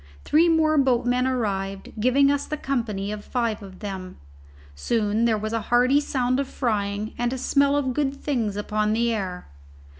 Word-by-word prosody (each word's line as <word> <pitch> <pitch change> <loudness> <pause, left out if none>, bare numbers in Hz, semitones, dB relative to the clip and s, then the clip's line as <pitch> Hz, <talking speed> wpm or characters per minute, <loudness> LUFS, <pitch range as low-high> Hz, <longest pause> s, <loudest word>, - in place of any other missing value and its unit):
Three 330 +3 +4
more 315 -2 +3
boatmen 250 -1 +2
arrived, 195 -6 -2
giving 275 +5 +4
us 285 0 -1
the 305 - -3
company 220 -8 -2
of 210 -1 -6
five 230 -4 -2
of 190 -2 -12
them. 190 -3 -6 0.6
Soon 210 - 0
there 225 -2 +2
was 215 +1 -4
a 230 - 0
hearty 250 +4 +4
sound 255 -2 0
of 280 - -1
frying 210 -4 -2
and 240 0 0
a 260 - -3
smell 280 +2 +2
of 260 -3 0
good 280 0 0
things 240 -8 -2
upon 210 +1 0
the 235 +1 +1
air. 185 -4 -4
235 Hz, 175 wpm, -24 LUFS, 210-270 Hz, 0.6 s, Three